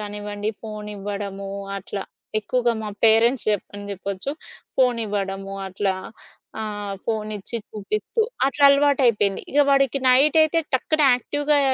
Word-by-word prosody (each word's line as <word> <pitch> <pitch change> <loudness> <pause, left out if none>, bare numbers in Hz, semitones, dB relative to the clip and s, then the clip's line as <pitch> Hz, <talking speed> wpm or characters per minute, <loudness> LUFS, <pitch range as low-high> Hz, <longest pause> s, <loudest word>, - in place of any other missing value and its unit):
కానివ్వండి 205 0 -4
ఫోనివ్వడము 205 -2 -5 0.3
అట్లా, 195 0 -5 0.4
ఎక్కువగా 240 +2 +1
మా 210 - -4
పేరెంట్స్ 225 +2 +4
చెప్ప 205 -2 -1
అని 205 0 -8
చెప్పొచ్చు 195 +5 -4 0.5
ఫోనివ్వడము 200 -6 0
అట్లా 190 +1 -1 0.7
ఆహ్, 205 -2 -4
ఫోనిచ్చి 215 0 -2
చూపిస్తూ 215 - -3 0.3
అట్లా 280 +1 +1
అలవాటైపోయింది. 265 -8 +3
ఇక 290 - +4
వాడికి 275 -1 +3
నైటయితే 305 +5 +5 0.2
టక్కన 310 +4 +1
యాక్టివ్‌గా 290 +4 0
215 Hz, 105 wpm, -23 LUFS, 200-260 Hz, 0.7 s, నైటయితే